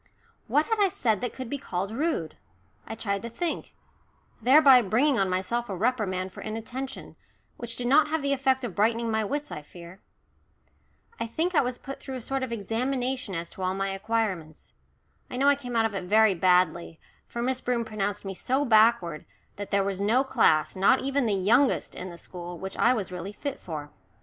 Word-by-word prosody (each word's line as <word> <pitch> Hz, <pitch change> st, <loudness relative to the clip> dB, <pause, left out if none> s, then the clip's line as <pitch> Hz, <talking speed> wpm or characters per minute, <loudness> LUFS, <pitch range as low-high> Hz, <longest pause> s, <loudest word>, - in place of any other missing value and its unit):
What 300 Hz, +1 st, +3 dB
had 450 Hz, -1 st, -1 dB
I 400 Hz, -2 st, +4 dB
said 220 Hz, -, 0 dB
that 245 Hz, -, -2 dB
could 260 Hz, -2 st, -7 dB
be 280 Hz, +4 st, -4 dB
called 195 Hz, -5 st, -3 dB
rude? 230 Hz, -, -2 dB, 0.5 s
I 225 Hz, -, -5 dB
tried 200 Hz, -3 st, -2 dB
to 235 Hz, -, -6 dB
think, 335 Hz, +8 st, -4 dB, 0.7 s
thereby 265 Hz, +1 st, +7 dB
bringing 240 Hz, +6 st, +2 dB
on 195 Hz, -1 st, +2 dB
myself 195 Hz, +6 st, -1 dB
a 195 Hz, -, -3 dB
reprimand 190 Hz, -4 st, -1 dB
for -, -, -9 dB
inattention, 240 Hz, +5 st, -6 dB, 0.4 s
which 235 Hz, -1 st, -5 dB
did 245 Hz, -, -3 dB
not 290 Hz, +5 st, +5 dB
have 310 Hz, -1 st, -1 dB
the 280 Hz, 0 st, +1 dB
effect 265 Hz, -1 st, +1 dB
of 235 Hz, -6 st, -4 dB
brightening 225 Hz, +3 st, +1 dB
my 220 Hz, 0 st, +1 dB
wits, 290 Hz, +7 st, -3 dB
I 150 Hz, -, -5 dB
fear. 170 Hz, +5 st, -13 dB, 1.2 s
I -, -, -2 dB
think 325 Hz, +10 st, -1 dB
I -, -, +5 dB
was 250 Hz, -1 st, -3 dB
put 275 Hz, +2 st, -8 dB
through 265 Hz, -, -7 dB
a 255 Hz, -, -5 dB
sort 270 Hz, +3 st, -2 dB
of 260 Hz, -2 st, -3 dB
examination 245 Hz, +1 st, -2 dB
as 165 Hz, 0 st, -5 dB
to -, -, -10 dB
all 185 Hz, 0 st, 0 dB
my 195 Hz, 0 st, -1 dB
acquirements. 195 Hz, -6 st, -3 dB, 0.6 s
I 250 Hz, -, -5 dB
know 275 Hz, +2 st, +2 dB
I 285 Hz, -, +7 dB
came 250 Hz, -4 st, -7 dB
out 225 Hz, -1 st, +3 dB
of 220 Hz, -, -1 dB
it 190 Hz, -2 st, -4 dB
very 215 Hz, +2 st, +5 dB
badly, 180 Hz, -2 st, +2 dB, 0.3 s
for 235 Hz, -, -4 dB
Miss 260 Hz, +1 st, -1 dB
Broom 240 Hz, -2 st, -1 dB
pronounced 205 Hz, -2 st, -3 dB
me 195 Hz, -, -4 dB
so 265 Hz, +9 st, 0 dB
backward 215 Hz, -, +3 dB, 0.3 s
that 205 Hz, 0 st, -6 dB
there 200 Hz, 0 st, +2 dB
was 195 Hz, 0 st, -3 dB
no 230 Hz, +6 st, +3 dB
class, 220 Hz, -, +2 dB
not 200 Hz, +8 st, +4 dB
even 275 Hz, -1 st, 0 dB
the 205 Hz, -, +1 dB
youngest, 235 Hz, +8 st, +2 dB
in 185 Hz, -, -7 dB
the 170 Hz, -, -10 dB
school, 175 Hz, 0 st, -8 dB
which 190 Hz, +2 st, -6 dB
I 240 Hz, -, +4 dB
was 215 Hz, -7 st, -1 dB
really 180 Hz, +3 st, -6 dB
fit 280 Hz, +5 st, -5 dB
for. 150 Hz, -4 st, -7 dB
225 Hz, 205 wpm, -27 LUFS, 190-260 Hz, 1.2 s, thereby